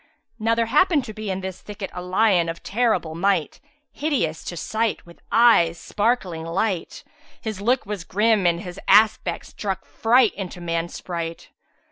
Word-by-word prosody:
Now 225 Hz, +1 st, +2 dB
there 230 Hz, 0 st, +1 dB
happened 300 Hz, +3 st, +3 dB
to 215 Hz, -, -7 dB
be 215 Hz, -1 st, -6 dB
in 190 Hz, 0 st, -2 dB
this 190 Hz, -1 st, -6 dB
thicket 205 Hz, -2 st, -7 dB
a 180 Hz, -, -5 dB
lion 180 Hz, -2 st, +2 dB
of 165 Hz, 0 st, -6 dB
terrible 220 Hz, -7 st, 0 dB
might; 175 Hz, -2 st, 0 dB, 0.3 s
hideous 245 Hz, -, -1 dB
to 175 Hz, -, -5 dB
sight, 220 Hz, +6 st, -1 dB
with 170 Hz, 0 st, -16 dB
eyes 200 Hz, -8 st, +5 dB
sparkling 205 Hz, -7 st, -1 dB
light: 180 Hz, +2 st, -2 dB, 0.4 s
his 215 Hz, -4 st, -5 dB
look 245 Hz, +4 st, +1 dB
was 205 Hz, -4 st, -5 dB
grim 210 Hz, 0 st, +2 dB
and 170 Hz, 0 st, +1 dB
his 180 Hz, -1 st, -8 dB
aspect 215 Hz, +2 st, +4 dB
struck 195 Hz, -2 st, -5 dB
fright 235 Hz, 0 st, +3 dB
into 185 Hz, -2 st, -6 dB
man's 170 Hz, 0 st, -3 dB
sprite. 170 Hz, -2 st, -5 dB
195 Hz, 160 wpm, -23 LUFS, 175-225 Hz, 0.4 s, eyes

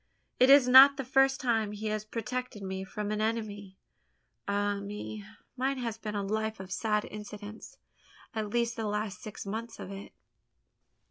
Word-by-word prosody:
It 255 Hz, -, +6 dB
is 275 Hz, -2 st, +8 dB
not 270 Hz, +2 st, +9 dB
the 270 Hz, -, -2 dB
first 270 Hz, +1 st, +3 dB
time 225 Hz, -4 st, 0 dB
he 210 Hz, +1 st, -6 dB
has 215 Hz, 0 st, -2 dB
protected 230 Hz, 0 st, -4 dB
me 190 Hz, 0 st, -4 dB
from 205 Hz, +2 st, -4 dB
an 215 Hz, 0 st, -1 dB
enemy. 210 Hz, -3 st, -3 dB, 0.7 s
Ah 205 Hz, 0 st, 0 dB
me! 210 Hz, +1 st, -6 dB, 0.3 s
mine 265 Hz, +1 st, 0 dB
has 230 Hz, -3 st, -4 dB
been 210 Hz, -2 st, -5 dB
a 200 Hz, -, -1 dB
life 220 Hz, +1 st, -2 dB
of 190 Hz, -1 st, -9 dB
sad 210 Hz, +1 st, 0 dB
incidents 210 Hz, 0 st, -9 dB, 0.6 s
at 215 Hz, -2 st, -3 dB
least 235 Hz, +1 st, 0 dB
the 225 Hz, -2 st, -3 dB
last 210 Hz, -2 st, -3 dB
six 210 Hz, -1 st, -8 dB
months 225 Hz, +3 st, -5 dB
of 190 Hz, -, -7 dB
it." 195 Hz, 0 st, -8 dB
215 Hz, 170 wpm, -30 LUFS, 205-235 Hz, 0.7 s, not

